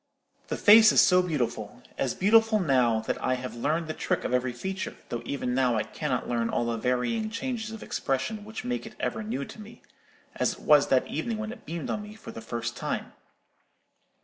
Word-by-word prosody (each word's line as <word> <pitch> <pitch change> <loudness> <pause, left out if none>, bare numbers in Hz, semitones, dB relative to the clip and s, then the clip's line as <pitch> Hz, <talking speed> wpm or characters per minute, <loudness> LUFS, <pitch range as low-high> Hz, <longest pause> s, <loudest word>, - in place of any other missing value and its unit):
"The - - -3
face 220 +1 +8
is - - +4
so 180 0 +6
beautiful,—as 120 - -3
beautiful 220 +2 +4
now 125 - +3
that - - -3
I 130 - +2
have 125 0 -6
learned 155 +7 -1
the 155 - -3
trick - - -1
of - - -2
every 125 0 +1
feature, 190 +10 -5
though 120 - -3
even 125 -3 -2
now 125 -2 +2
I 110 - +1
cannot - - -3
learn 115 -1 0
all 120 - 0
the 115 -1 -1
varying 125 - 0
changes 230 -1 -3
of 225 -1 -8
expression 150 +11 -2
which 220 +3 -7
make 245 -2 -3
it 215 - -12
ever - - -2
new 210 -10 -3
to 215 - -11
me, 225 +2 -13 0.5
as - - +1
it - - -13
was - - +5
that - - +3
evening 235 -3 -3
when 220 0 -4
it 245 - -12
beamed 165 0 -4
on 210 - -2
me 210 +1 -10
for 220 - -10
the 115 - -8
first 115 +1 -4
time. - - -4
160 Hz, 205 wpm, -27 LUFS, -, 0.5 s, face